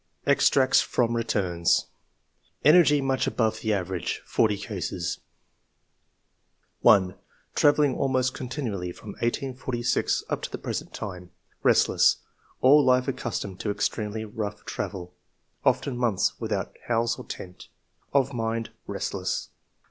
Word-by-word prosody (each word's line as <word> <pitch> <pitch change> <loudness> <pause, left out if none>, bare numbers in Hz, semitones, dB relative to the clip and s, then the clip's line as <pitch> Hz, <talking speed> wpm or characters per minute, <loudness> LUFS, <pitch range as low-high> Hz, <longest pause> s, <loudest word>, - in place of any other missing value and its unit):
Extracts 135 -1 +4
from 120 -1 0
Returns. 95 -7 +1 0.8
ENERGY 150 -2 +6
MUCH 135 -1 0
ABOVE 110 -2 0
THE 110 - -1
AVERAGE 95 -2 -3
FORTY 105 -2 +2
CASES. 90 -4 -4 1.6
1. 95 -2 +5 0.2
'* - - -38
Travelling 145 -2 +4
almost 130 -2 +1
continually 115 - -4
from 105 - -12
1846 120 +2 -1
up - - -2
to - - -4
the - - -5
present - - -5
time. 90 -3 -7 0.3
Restless. - - +4 0.4
All 145 +3 +7
life 130 -1 +4
ac 135 - 0
customed 100 -5 -4
to 105 - -3
extremely 105 +1 -2
rough 105 -1 -5
travel; 90 -3 -5 0.5
often 140 - +1
months 120 -6 +1
without - - -3
house 115 0 +1
or - - -8
tent. 90 -1 -9 0.4
Of 140 -1 +2
mind 115 -1 -2
— - - -47
restless. - - -3
115 Hz, 125 wpm, -26 LUFS, 100-130 Hz, 1.6 s, All